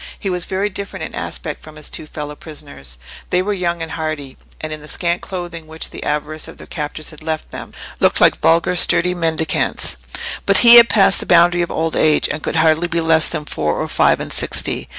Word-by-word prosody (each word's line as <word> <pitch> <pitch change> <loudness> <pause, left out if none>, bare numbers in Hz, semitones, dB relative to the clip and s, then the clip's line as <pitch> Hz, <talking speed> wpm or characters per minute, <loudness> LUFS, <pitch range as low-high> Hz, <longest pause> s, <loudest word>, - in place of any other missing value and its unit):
He 195 - -3
was 180 -1 -2
very 195 +2 -1
different 190 -2 -5
in - - -6
aspect 150 - -5
from 155 0 -13
his 150 -1 -6
two 155 - -4
fellow 150 -1 -7
prisoners. 145 - -8 0.3
They 180 +1 +1
were 205 +2 -1
young 175 -3 -2
and 160 - -7
hardy, 150 -3 -4 0.2
and, 155 0 -4
in 155 - -7
the 150 - -11
scant 170 +2 -1
clothing 175 -3 -6
which 160 0 -2
the - - -8
avarice 150 +1 -3
of - - -12
their - - -12
captors 150 +1 -5
had 155 - -13
left 155 0 -4
them, - - -8 0.3
looked - - +3
like - - +4
vulgar, 170 +2 +3
sturdy 175 0 +5
mendicants. 160 - -1 0.5
But 200 - +5
he 235 0 +11
had 235 0 +8
passed 195 -2 +4
the - - -5
boundary 175 0 +5
of 170 - -2
old 160 0 -2
age, 155 -1 +3
and 155 - -4
could - - -3
hardly 160 +1 +3
be 170 0 -1
less 160 -1 +3
than 150 - -4
four 75 - -2
or - - -2
five - - +2
and - - -5
sixty. - - -1
160 Hz, 220 wpm, -18 LUFS, 155-175 Hz, 0.5 s, he